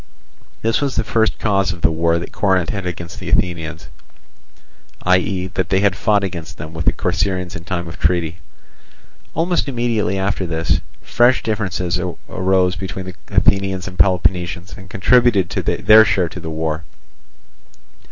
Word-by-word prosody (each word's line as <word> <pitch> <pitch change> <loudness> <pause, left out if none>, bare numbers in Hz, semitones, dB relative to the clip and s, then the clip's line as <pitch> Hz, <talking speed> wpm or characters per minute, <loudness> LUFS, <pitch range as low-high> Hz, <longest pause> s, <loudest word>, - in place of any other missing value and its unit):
This 115 +4 +1
was 140 -2 -1
the - - +1
first 110 -1 +1
cause 100 -4 +1
of 85 -1 -8
the 80 - +3
war 85 +1 +1
that 85 - -6
Corinth 95 -4 +1
had 100 -3 -4
against 85 -1 -6
the - - -6
Athenians, 85 -1 -1 1.2
viz., 90 0 +1
that 90 0 -1
they 95 0 +2
had 100 -2 +3
fought 105 -1 +2
against 85 -4 -5
them 80 +1 -8
with 80 -1 -4
the - - +4
Corcyraeans 90 -3 -1
in 80 - -8
time 85 -2 -3
of 80 - -9
treaty. 85 0 +1 1.0
Almost 170 0 +1
immediately 120 -7 0
after 95 -1 -1
this, 80 -1 0 0.2
fresh 120 +2 +3
differences 95 -5 -1 0.3
arose 95 -1 +1
between 95 0 -5
the 95 -1 -8
Athenians 95 -2 +1
and 90 -2 -9
Peloponnesians, 90 0 +1
and 95 -2 -13
contributed 100 -1 +3
their 110 +1 +5
share 95 -4 +1
to 90 - -8
the 80 -1 -6
war. 80 0 -2
95 Hz, 155 wpm, -19 LUFS, 85-100 Hz, 1.2 s, their